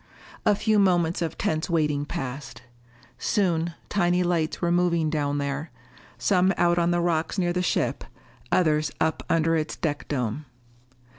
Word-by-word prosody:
A 205 - +5
few 215 +1 +2
moments 175 -3 +2
of 165 -1 -2
tense 155 +2 -1
waiting 150 -4 +1
passed. 125 -3 -6 0.6
Soon 170 -5 0
tiny 180 -2 +2
lights 170 -2 0
were 170 -1 0
moving 170 -3 +2
down 145 -2 0
there, 140 +2 -3 0.5
some 185 -1 +3
out 175 0 +3
on 170 0 +2
the 175 0 +2
rocks 170 +1 0
near 175 -2 +1
the 180 - 0
ship, 180 - 0 0.5
others 155 -3 +2
up 160 0 0
under 165 0 +2
its 155 -1 -2
deck 145 -3 -3
dome. 130 +1 -2
165 Hz, 150 wpm, -25 LUFS, 150-175 Hz, 0.6 s, A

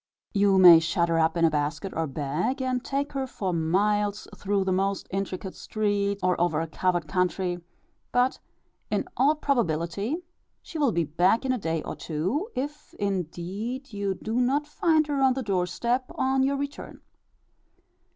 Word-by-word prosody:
You 200 -2 +4
may 175 -3 +10
shut 170 +1 0
her 165 0 +2
up 160 +1 +2
in 165 - +4
a 160 - +3
basket 150 +6 -2
or 165 0 0
bag 150 - -2
and 255 -1 -1
take 280 +1 -2
her 270 -1 -2
for 190 -7 -3
miles 205 +5 +1
through 200 -1 0
the 190 - -1
most 195 +1 0
intricate 190 -1 -3
streets, 200 -2 -1
or 180 -1 +2
over 165 -3 +2
a 165 - -1
covered 175 +1 -1
country; 180 +1 0 0.5
but 250 +1 +2 0.5
in - - 0
all 285 +4 +4
probability 210 - 0 0.5
she 325 - -7
will 280 -5 +3
be 170 -3 +1
back 175 - +2
in 260 - +1
a 255 - 0
day 165 -4 -2
or - - -5
two, 190 - -2
if 290 +3 -5
indeed 200 - -4
you 200 -1 -1
do 220 +4 -3
not 275 +4 +1
find 315 +1 +2
her 290 -2 -1
on 265 -1 +5
the 265 - -2
door 185 -4 0
step 240 +8 -1
on 265 0 +1
your 275 +1 +2
return. 285 +1 -6
200 Hz, 170 wpm, -26 LUFS, 175-260 Hz, 0.5 s, may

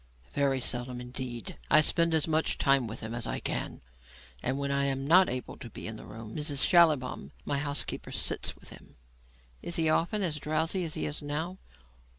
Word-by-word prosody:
"Very 135 -2 +1
seldom 125 0 -1
indeed. 125 -1 -6
I 155 - +7
spend 165 +1 +3
as 160 - +2
much 160 0 +1
time 135 -4 +3
with 110 +1 -7
him 110 +1 -5
as 120 -1 -3
I - - -2
can, - - -3 0.6
and 130 +2 -1
when 140 0 -2
I 140 0 +1
am 135 0 -1
not 185 +5 +6
able 125 0 -5
to 120 - -9
be - - -9
in 110 - -4
the - - -11
room, 110 +1 -9
Mrs 145 -2 +3
Schallibaum, 150 - +3
my 140 - 0
housekeeper, 145 0 -1
sits - - -1
with - - -13
him." - - -14 0.7
"Is 170 - -2
he 160 -1 +3
often 175 +6 +1
as 160 -5 0
drowsy 160 +5 0
as 155 - -3
he - - -2
is 150 +1 -3
now?" 160 +6 -4
140 Hz, 195 wpm, -29 LUFS, 125-160 Hz, 0.7 s, I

